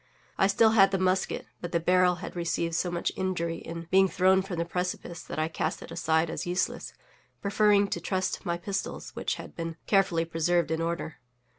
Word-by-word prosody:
I 195 Hz, -, +3 dB
still 220 Hz, +3 st, +4 dB
had 195 Hz, -3 st, +6 dB
the 195 Hz, -, 0 dB
musket, 185 Hz, 0 st, 0 dB, 0.2 s
but 175 Hz, -, -6 dB
the 170 Hz, -, +3 dB
barrel 180 Hz, +1 st, +3 dB
had -, -, -8 dB
received 170 Hz, -1 st, -1 dB
so 175 Hz, +2 st, 0 dB
much 175 Hz, 0 st, -1 dB
injury 170 Hz, -3 st, -2 dB
in 165 Hz, 0 st, -7 dB
being 190 Hz, 0 st, +6 dB
thrown 190 Hz, +1 st, +3 dB
from 190 Hz, -2 st, -5 dB
the 170 Hz, -, 0 dB
precipice 180 Hz, -1 st, -4 dB
that -, -, -8 dB
I 155 Hz, 0 st, +1 dB
cast 160 Hz, -, -3 dB
it -, -, -11 dB
aside 160 Hz, 0 st, +1 dB
as 170 Hz, -, -4 dB
useless, 180 Hz, +1 st, -2 dB, 0.4 s
preferring 205 Hz, 0 st, +3 dB
to -, -, -3 dB
trust 185 Hz, -1 st, -2 dB
my 170 Hz, 0 st, -1 dB
pistols, 195 Hz, +2 st, -4 dB
which -, -, -2 dB
had -, -, -10 dB
been 165 Hz, -1 st, -5 dB
carefully 190 Hz, -5 st, +2 dB
preserved 165 Hz, 0 st, +1 dB
in 160 Hz, 0 st, 0 dB
order. 165 Hz, -1 st, -3 dB
175 Hz, 195 wpm, -28 LUFS, 165-190 Hz, 0.4 s, had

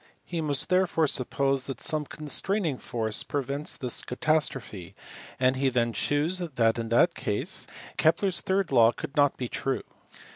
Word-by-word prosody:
He 170 Hz, -2 st, -3 dB
must 145 Hz, -2 st, +2 dB
therefore 180 Hz, -3 st, +2 dB
suppose 135 Hz, 0 st, 0 dB
that 135 Hz, -, -5 dB
some 150 Hz, -2 st, 0 dB
constraining 155 Hz, +1 st, 0 dB
force 110 Hz, -3 st, -1 dB
prevents 140 Hz, +1 st, -3 dB
this 125 Hz, -2 st, -1 dB
catastrophe, 125 Hz, -, -2 dB, 0.4 s
and 130 Hz, +1 st, +3 dB
he 135 Hz, 0 st, +2 dB
then 120 Hz, -2 st, 0 dB
shews 150 Hz, -, 0 dB
that 125 Hz, -10 st, 0 dB
in 115 Hz, -1 st, -4 dB
that 145 Hz, +9 st, +4 dB
case 105 Hz, -9 st, -1 dB, 0.3 s
Kepler 165 Hz, +5 st, +3 dB
s 180 Hz, -, -1 dB
third 190 Hz, -3 st, 0 dB
law 115 Hz, -2 st, +5 dB
could 140 Hz, -, -8 dB
not 145 Hz, -2 st, +3 dB
be 125 Hz, -, -3 dB
true. 135 Hz, +2 st, -2 dB
140 Hz, 155 wpm, -27 LUFS, 125-160 Hz, 0.4 s, law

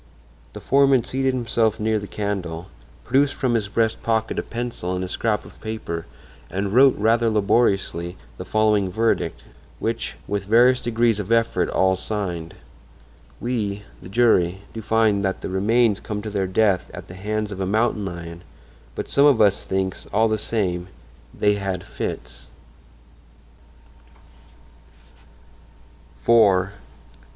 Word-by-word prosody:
The -, -, -7 dB
foreman 135 Hz, -2 st, +4 dB
seated 130 Hz, +1 st, -1 dB
himself 115 Hz, -3 st, 0 dB
near 110 Hz, 0 st, +1 dB
the 100 Hz, -, -7 dB
candle, 95 Hz, -5 st, -4 dB, 0.3 s
produced 140 Hz, +2 st, +2 dB
from 130 Hz, -4 st, 0 dB
his 110 Hz, -3 st, 0 dB
breast 110 Hz, +1 st, 0 dB
pocket 110 Hz, -1 st, 0 dB
a -, -, +1 dB
pencil 115 Hz, -6 st, -4 dB
and 90 Hz, 0 st, -3 dB
scrap 105 Hz, +3 st, -1 dB
of -, -, -15 dB
paper 110 Hz, -7 st, -5 dB, 0.4 s
and 100 Hz, +1 st, -2 dB
wrote 135 Hz, +2 st, +6 dB
rather 115 Hz, +2 st, +3 dB
laboriously 100 Hz, -5 st, +1 dB, 0.2 s
the -, -, -4 dB
following 105 Hz, -3 st, +2 dB
verdict, 115 Hz, +3 st, 0 dB, 0.3 s
which -, -, -3 dB
with 100 Hz, -1 st, -2 dB
various 120 Hz, +4 st, +5 dB
degrees 115 Hz, -2 st, +1 dB
of 105 Hz, +1 st, -4 dB
effort 115 Hz, -6 st, +2 dB
all 95 Hz, 0 st, +2 dB
signed: 90 Hz, -5 st, -4 dB, 0.8 s
"We, 105 Hz, -5 st, -2 dB, 0.2 s
the -, -, -10 dB
jury, 95 Hz, -5 st, +3 dB
do 115 Hz, -, -6 dB
find 110 Hz, -2 st, +2 dB
that 95 Hz, -1 st, -1 dB
the -, -, -4 dB
remains 105 Hz, +3 st, +2 dB
come 105 Hz, -1 st, -5 dB
to 110 Hz, -, -5 dB
their 100 Hz, -2 st, -1 dB
death 95 Hz, -1 st, +1 dB
at -, -, -9 dB
the -, -, -10 dB
hands 105 Hz, +3 st, -3 dB
of 95 Hz, -1 st, -5 dB
a 95 Hz, -, -1 dB
mountain 110 Hz, +1 st, +1 dB
lion, 85 Hz, -2 st, -7 dB, 0.5 s
but -, -, -4 dB
some 140 Hz, +1 st, +4 dB
of 135 Hz, -6 st, +4 dB
us 100 Hz, -2 st, +3 dB
thinks, 95 Hz, -1 st, -2 dB
all 110 Hz, +3 st, +3 dB
the 110 Hz, -1 st, 0 dB
same, 90 Hz, -6 st, -2 dB, 0.4 s
they 105 Hz, 0 st, +2 dB
had 95 Hz, -3 st, -3 dB
fits." -, -, -6 dB
105 Hz, 140 wpm, -22 LUFS, 95-115 Hz, 0.8 s, wrote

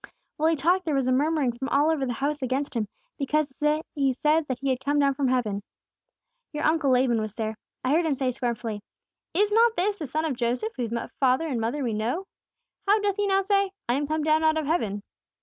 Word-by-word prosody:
"While 315 Hz, +1 st, +3 dB
He 325 Hz, -, +2 dB
talked 350 Hz, +6 st, +2 dB
there 310 Hz, -3 st, 0 dB
was 270 Hz, -2 st, +1 dB
a -, -, +2 dB
murmuring 285 Hz, -1 st, +2 dB
all 290 Hz, +3 st, +3 dB
over 280 Hz, -4 st, 0 dB
the 245 Hz, -, -1 dB
house 285 Hz, +5 st, -2 dB
against 265 Hz, +3 st, -1 dB
Him, 220 Hz, -3 st, 0 dB, 0.3 s
because 285 Hz, 0 st, 0 dB, 0.4 s
He 275 Hz, -3 st, +1 dB
said 300 Hz, +4 st, +2 dB
that 260 Hz, -, -2 dB
He 270 Hz, +1 st, -1 dB
had 255 Hz, -, -1 dB
come 290 Hz, +2 st, +1 dB
down 280 Hz, -1 st, +3 dB
from 270 Hz, 0 st, 0 dB
heaven. 230 Hz, -6 st, 0 dB, 0.9 s
Your 300 Hz, 0 st, -3 dB
uncle 310 Hz, -2 st, +2 dB
Laban 250 Hz, -3 st, +3 dB
was 215 Hz, -1 st, -5 dB
there. 220 Hz, -1 st, -3 dB, 0.3 s
I 255 Hz, -, +1 dB
heard 325 Hz, +2 st, +3 dB
him 290 Hz, -, +1 dB
say 260 Hz, -1 st, 0 dB
scornfully: 235 Hz, -4 st, -3 dB, 0.5 s
'Is 410 Hz, +3 st, +3 dB
not 460 Hz, +1 st, +4 dB
this 405 Hz, +3 st, +1 dB
the 305 Hz, -, -4 dB
son 310 Hz, +5 st, -1 dB
of 300 Hz, -5 st, -1 dB
Joseph, 235 Hz, -2 st, -1 dB
whose 240 Hz, -3 st, -3 dB, 0.3 s
father 265 Hz, +4 st, +3 dB
and 260 Hz, -6 st, -2 dB
mother 250 Hz, +6 st, -1 dB
we 235 Hz, -3 st, -1 dB
know? 240 Hz, -, -2 dB, 0.6 s
How 415 Hz, +2 st, +5 dB
doth 410 Hz, -1 st, 0 dB
He 410 Hz, 0 st, +1 dB
now 390 Hz, 0 st, +3 dB
say, 395 Hz, -1 st, +1 dB
"I 240 Hz, -, +2 dB
am 285 Hz, +2 st, 0 dB
come 310 Hz, 0 st, -1 dB
down 310 Hz, +1 st, +3 dB
out 315 Hz, 0 st, +3 dB
of 310 Hz, -, -1 dB
heaven"?' 215 Hz, -, -1 dB
280 Hz, 225 wpm, -26 LUFS, 250-320 Hz, 0.9 s, How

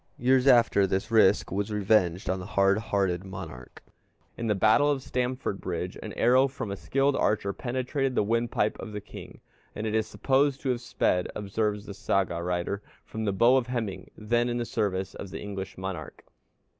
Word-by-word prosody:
Years 130 Hz, +1 st, +3 dB
after, 115 Hz, -6 st, +5 dB
this 95 Hz, +5 st, -2 dB
risk 110 Hz, -4 st, +4 dB
was 100 Hz, +3 st, -2 dB
revenged 100 Hz, -4 st, +2 dB
upon 95 Hz, +1 st, 0 dB
the 90 Hz, -, -7 dB
hard 100 Hz, 0 st, +3 dB
hearted 95 Hz, -5 st, 0 dB
monarch. 85 Hz, -10 st, -9 dB, 0.5 s
In 115 Hz, -, -4 dB
the 105 Hz, -, +2 dB
battle 110 Hz, +9 st, +4 dB
of 140 Hz, -3 st, 0 dB
Stamfordbridge 100 Hz, -8 st, -3 dB
an -, -, -6 dB
arrow 130 Hz, +2 st, +4 dB
from 130 Hz, -6 st, -6 dB
a -, -, -2 dB
skilled 135 Hz, +6 st, +1 dB
archer 100 Hz, -2 st, +1 dB
penetrated 130 Hz, +2 st, -2 dB
the -, -, +3 dB
windpipe 115 Hz, -1 st, 0 dB
of 110 Hz, -, -7 dB
the 105 Hz, -, -3 dB
king, 100 Hz, -, -11 dB, 0.3 s
and 105 Hz, -, -4 dB
it 110 Hz, -, -2 dB
is 110 Hz, -1 st, +1 dB
supposed 135 Hz, +4 st, +1 dB
to 135 Hz, -, -2 dB
have 125 Hz, -2 st, 0 dB
sped, 105 Hz, -6 st, 0 dB
observes 105 Hz, 0 st, -2 dB
the 100 Hz, -, -7 dB
Saga 95 Hz, -3 st, 0 dB
writer, 90 Hz, +3 st, -2 dB, 0.2 s
from 110 Hz, 0 st, -5 dB
the 100 Hz, -, +1 dB
bow 120 Hz, +7 st, +5 dB
of 125 Hz, -2 st, 0 dB
Hemingr, 115 Hz, -6 st, -3 dB
then 120 Hz, +3 st, +1 dB
in 120 Hz, -, -1 dB
the 120 Hz, -, -2 dB
service 95 Hz, -5 st, -2 dB
of 100 Hz, -, -8 dB
the -, -, -6 dB
English 100 Hz, -2 st, -6 dB
monarch. 95 Hz, -4 st, -6 dB
105 Hz, 185 wpm, -27 LUFS, 95-120 Hz, 0.5 s, after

